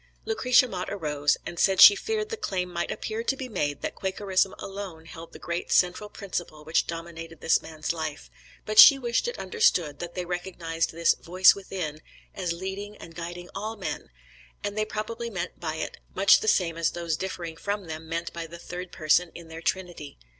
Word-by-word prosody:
Lucretia 255 - +4
Mott 180 -6 -4
arose, 150 -6 0
and 170 - -6
said 190 -1 +3
she 205 - +11
feared 430 - -2
the 450 - -2
claim 185 - -3
might 170 0 -2
appear 220 +1 -3
to 270 +3 0
be 260 - -5
made 145 - -2
that - - -2
Quakerism 190 0 0
alone 195 -5 -7
held 165 0 -10
the - - -11
great 170 +1 -4
central 180 +4 +2
principle 175 -7 -6
which 160 +1 +1
dominated 165 -1 -7
this - - +3
man's 160 0 -4
life; 155 - -5 0.3
but 215 0 +2
she 275 - +11
wished 240 - 0
it 485 - -3
understood 175 - +1
that 175 0 -6
they 180 -1 -3
recognized 175 -2 -2
this 165 +1 +3
"voice 185 +2 +5
within" 180 -6 -5 0.3
as 180 -3 -2
leading 190 +4 -5
and 165 - -11
guiding 175 +1 -7
all 215 +3 -4
men, 205 - -5 0.5
and 205 0 -3
they 215 0 0
probably 225 +2 -4
meant 180 -4 -5
by 160 -2 -3
it 160 - -4 0.2
much 195 +1 +6
the - - -4
same 170 -5 +2
as 165 - +2
those 170 -2 -2
differing 170 -2 -5
from 200 +3 -3
them 160 0 -7
meant 170 +1 -3
by 170 -1 -5
the 170 +1 -10
Third 180 +1 -7
person 165 +2 +2
in 170 -1 -10
their 165 0 -8
Trinity. 170 -4 -3
180 Hz, 195 wpm, -27 LUFS, 165-200 Hz, 0.5 s, she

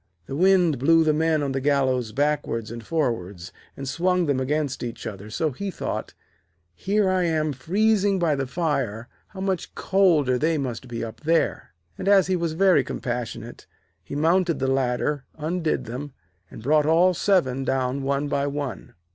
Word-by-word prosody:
The 135 - -6
wind 180 -4 +3
blew 165 +4 +5
the 155 -1 +3
men 160 -1 +1
on 140 - -1
the 135 0 -2
gallows 130 -5 +1
backwards 140 -5 -1
and 115 -1 -7
forwards, 100 - -2 0.2
and 135 - -6
swung 180 +4 +1
them 140 -4 +1
against 145 +1 -1
each 120 -1 -6
other, 100 0 -7
so 155 +7 -1
he 195 +10 -5
thought: - - -5 0.6
'Here 200 - 0
am 165 -5 +1
I 145 - -4
freezing 200 - +2
by 170 -4 +2
the 135 -2 -2
fire, 125 - -2 0.2
how 190 - -9
much 190 -2 -2
colder 160 -10 +2
they 160 +2 +1
must 130 -3 -4
be 115 -1 -4
up 115 -1 -7
there.' 160 - 0 0.2
And - - -4
as 200 -2 +6
he 185 - 0
was 170 -2 -1
very 180 -4 +4
compassionate, 120 -2 -5 0.4
he 115 - -7
mounted 170 +2 +2
the 135 - -1
ladder, 135 +1 0
undid 160 +1 -1
them, 130 +5 -6 0.4
and 110 - -11
brought 150 +3 +3
all 175 +3 +4
seven 145 -9 +1
down 130 0 -1
one 140 +1 -1
by 140 0 0
one. 140 -3 -5
145 Hz, 170 wpm, -24 LUFS, 130-170 Hz, 0.6 s, as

